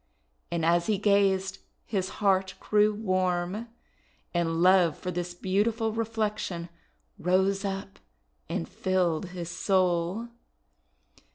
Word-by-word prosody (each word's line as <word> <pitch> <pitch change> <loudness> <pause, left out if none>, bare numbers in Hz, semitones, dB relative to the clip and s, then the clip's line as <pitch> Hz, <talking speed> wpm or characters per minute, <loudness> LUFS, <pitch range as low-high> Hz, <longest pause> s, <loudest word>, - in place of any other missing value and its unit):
And 170 -2 -1
as 170 +1 +3
he 215 -2 +2
gazed 195 -1 +2 0.3
his 190 -4 -1
cold - - -10
heart 190 -2 +2
grew 210 0 +3
warm, 185 0 -1 0.7
and 165 -1 0
love 180 -4 +5
for 180 - -4
this 175 0 -4
beautiful 215 +5 0
reflection 215 -6 -2 0.5
rose 190 +3 +2
up 195 0 -4 0.5
and 80 - -2
filled 185 -2 0
his 175 -1 -6
soul. 185 +3 +1
190 Hz, 110 wpm, -28 LUFS, 175-205 Hz, 0.7 s, love